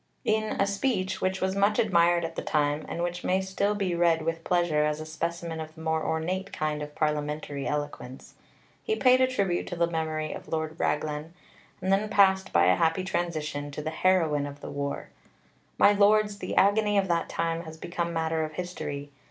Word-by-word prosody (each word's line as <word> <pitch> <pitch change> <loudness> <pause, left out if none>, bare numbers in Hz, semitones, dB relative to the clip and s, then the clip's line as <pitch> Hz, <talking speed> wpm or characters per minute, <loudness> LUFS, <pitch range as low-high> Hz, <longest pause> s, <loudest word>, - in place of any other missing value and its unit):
In 215 0 0
a 195 - +4
speech, 200 -2 -1
which 190 0 0
was 190 0 0
much 200 +2 +3
admired 175 -4 +3
at 165 0 -6
the - - -3
time, 150 0 0
and 170 - -3
which 175 0 -3
may 185 +1 +2
still 190 +2 0
be 195 -3 -1
read 170 -2 +2
with 165 +1 -2
pleasure 170 -4 +2
as 150 0 0
a 155 - -6
specimen 165 +1 -4
of 155 0 -7
the 160 - -11
more 160 -1 0
ornate 185 +5 -2
kind 150 -1 -2
of 150 0 -7
parliamentary 150 -2 -2
eloquence, 145 -3 -5 0.5
he 440 - -1
paid 255 -7 +5
a 260 - +5
tribute 200 -9 -1
to - - -4
the 170 0 +2
memory 160 -2 -2
of - - -9
Lord 160 0 -3
Raglan, 150 +2 -2 0.5
and 190 +1 +2
then 210 +2 +1
passed 190 -2 +4
by 85 - +4
a 90 0 +5
happy 165 +3 +2
transition 155 -6 -2
to 145 +1 -6
the 155 - -2
heroine 160 -4 +2
of 145 0 -9
the - - -7
war: 140 0 -4 0.7
"My 205 - +6
Lords, 205 0 +3
the - - -4
agony 205 +1 +4
of 195 -1 +2
that 170 -1 0
time 165 0 -2
has 160 0 -9
become 170 +1 -3
matter 160 -1 0
of 155 0 -5
history. 150 -5 -5
170 Hz, 200 wpm, -27 LUFS, 155-190 Hz, 0.7 s, My